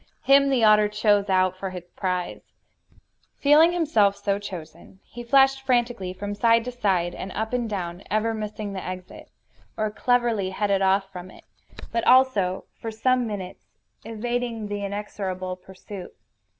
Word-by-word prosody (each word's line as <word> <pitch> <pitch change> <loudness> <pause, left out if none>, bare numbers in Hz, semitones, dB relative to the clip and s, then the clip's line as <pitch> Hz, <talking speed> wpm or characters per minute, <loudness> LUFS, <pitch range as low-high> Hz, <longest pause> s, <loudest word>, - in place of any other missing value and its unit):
Him 275 0 +5
the 260 -4 +2
otter 210 -1 +6
chose 210 -1 +1
out 185 -1 +2
for 190 +1 -5
his 180 -2 -9
prize. 180 -2 -3 1.0
Feeling 300 +4 +5
himself 285 - +2
so 200 0 -1
chosen, 190 -1 -10
he 240 - -10
flashed 270 +2 +4
frantically 240 -7 0
from 205 +2 -5
side 230 +2 +3
to 250 - -4
side, 190 -8 0
and 190 - -7
up 220 +2 -3
and 240 -2 -1
down, 180 -3 -4
ever 215 +2 0
missing 210 -1 -5
the 190 - -5
exit 185 0 -8 0.5
or 215 -1 -1
cleverly 235 -4 +1
headed 200 0 0
off 195 0 +2
from 180 -1 -9
it - - -16 0.5
but 230 - -1
also, 245 -8 +3
for 225 - -5
some 245 +2 +1
minutes, 195 -4 -7 0.4
evading 230 0 -3
the 205 0 -4
inexorable 195 -2 -4
pursuit. 190 +1 -11
210 Hz, 150 wpm, -24 LUFS, 190-240 Hz, 1.0 s, otter